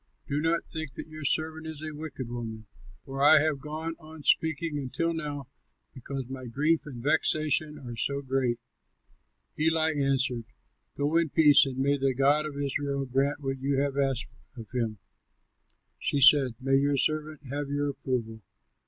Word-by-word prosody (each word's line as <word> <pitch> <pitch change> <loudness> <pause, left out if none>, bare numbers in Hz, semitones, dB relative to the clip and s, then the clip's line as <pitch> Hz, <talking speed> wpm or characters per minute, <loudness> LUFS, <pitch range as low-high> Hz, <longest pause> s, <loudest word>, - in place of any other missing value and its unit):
Do 145 +1 -1
not 165 +1 +1
think 160 -4 -3
that - - -7
your 155 -1 -8
servant 160 +2 0
is 155 -1 -7
a 155 0 -5
wicked 145 -4 -6
woman, 115 -2 -6 0.4
for 135 0 -5
I 155 +2 +8
have 155 -1 +1
gone 155 +3 -5
on 155 -1 -12
speaking 160 -1 +1
until 145 +5 -1
now 145 -4 -5 0.5
because 135 +1 -6
my 130 0 -7
grief 150 +7 +1
and 120 -5 -8
vexation 155 0 +2
are 120 -3 -8
so 140 +4 0
great." 130 -3 0 1.0
Eli 160 0 +2
answered, 135 -4 0 0.5
"Go 145 +3 +1
in 165 -2 +2
peace, 145 -1 +6
and 130 -1 -5
may 140 +2 +2
the 135 -1 +1
God 145 +3 +3
of 145 -2 -8
Israel 140 0 -2
grant 135 +3 0
what 135 -1 -3
you 135 +1 0
have 140 -1 0
asked 135 -2 0 0.3
of 115 -1 -10
him." 115 -4 -2 1.0
She 145 - 0
said, 135 -2 +7
"May 135 +1 +2
your 140 +1 +2
servant 155 +1 -1
have 145 0 -3
your 145 0 0
approval!" 125 -5 -4
140 Hz, 165 wpm, -28 LUFS, 135-155 Hz, 1.0 s, I